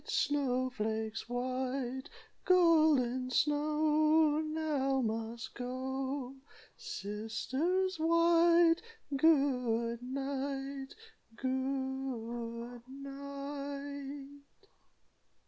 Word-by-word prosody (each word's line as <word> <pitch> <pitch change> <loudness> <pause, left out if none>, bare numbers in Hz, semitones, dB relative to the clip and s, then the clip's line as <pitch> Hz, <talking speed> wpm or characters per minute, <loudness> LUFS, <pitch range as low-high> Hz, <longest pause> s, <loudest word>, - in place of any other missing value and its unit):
Snow 255 -3 0
flakes 220 -1 -3
white. 255 +1 -2 0.3
Golden 310 -9 +4
Snow 305 +2 +3
Now 305 -4 0
must 225 0 -3
go. 265 +1 -4 0.4
Sisters 325 - -2
white, 335 +1 +5 0.3
Good 250 -6 +2
night! 270 +1 -4 0.4
Good 255 -3 -3
night!" 280 +1 -7
270 Hz, 55 wpm, -33 LUFS, 250-300 Hz, 0.4 s, white